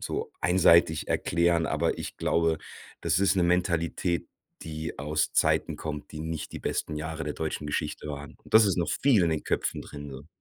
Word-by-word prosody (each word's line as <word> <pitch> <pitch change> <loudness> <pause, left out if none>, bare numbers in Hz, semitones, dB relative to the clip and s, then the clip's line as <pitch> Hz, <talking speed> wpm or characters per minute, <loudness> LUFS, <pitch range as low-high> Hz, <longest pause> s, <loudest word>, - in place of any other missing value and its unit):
so - - -3
einseitig 85 -3 +4
erklären, 85 0 +2
aber - - 0
ich - - -6
glaube, 80 -1 +1 0.4
das - - +1
ist 95 0 +3
'ne 90 - +3
Mentalität, 85 -1 0 0.3
die 80 -2 -6
aus 75 +2 0
Zeiten - - +2
kommt, 75 -2 -6
die 75 - -6
nicht 80 0 -5
die - - -5
besten 75 - -2
Jahre 80 0 -4
der 75 - -2
deutschen 80 -1 -3
Geschichte 75 +1 -3
waren. 70 0 -7
Und - - -12
das 110 -1 +8
ist 95 - +1
noch 85 - 0
viel 125 -9 +5
in 85 - +1
den 80 - -1
Köpfen - - -1
drin, 75 -1 -9
so. 70 +3 -10
80 Hz, 190 wpm, -28 LUFS, 75-85 Hz, 0.4 s, das